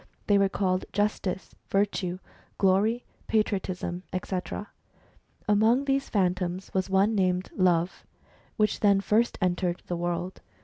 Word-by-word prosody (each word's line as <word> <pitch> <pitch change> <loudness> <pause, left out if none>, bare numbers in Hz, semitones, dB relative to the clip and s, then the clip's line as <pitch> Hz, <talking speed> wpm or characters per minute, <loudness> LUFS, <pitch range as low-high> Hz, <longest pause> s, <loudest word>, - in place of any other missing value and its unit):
They 205 -1 +4
were 195 -1 +3
called 185 -1 0
Justice, 205 -2 -1 0.2
Virtue, 195 -2 0 0.4
Glory, 205 +5 +2 0.2
Patriotism, 190 -4 -1 0.2
&c. 190 - -3 1.1
Among 220 +6 +4
these 275 0 0
Phantoms 185 -2 0
was 190 0 0
one 195 +3 +3
named 185 -2 +1
Love, 180 -1 +2 0.5
which 215 -2 +2
then 200 -2 +4
first 225 +4 +2
entered 175 -1 0
the 175 - -3
world. 175 +1 -3
190 Hz, 120 wpm, -27 LUFS, 180-210 Hz, 1.1 s, They